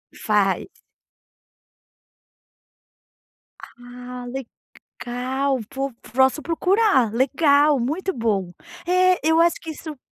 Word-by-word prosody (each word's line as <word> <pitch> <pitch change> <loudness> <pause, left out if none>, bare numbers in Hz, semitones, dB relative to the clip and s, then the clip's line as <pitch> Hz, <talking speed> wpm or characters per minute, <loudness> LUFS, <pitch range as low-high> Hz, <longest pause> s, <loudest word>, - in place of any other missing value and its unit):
Faz. 200 -3 0 2.9
Ah, 245 +1 -10
legal. 260 +1 -5
Pô, 275 0 -3 0.2
posso 265 +4 +3
procurar. 340 - +2
Legal. 285 +3 +3
Muito 315 +11 -2
bom. 210 -7 -1 0.3
É, 365 +1 +3
eu 320 +1 +4
acho 340 0 +4
que 320 - -6
isso 310 -1 -9
270 Hz, 85 wpm, -22 LUFS, 245-320 Hz, 2.9 s, eu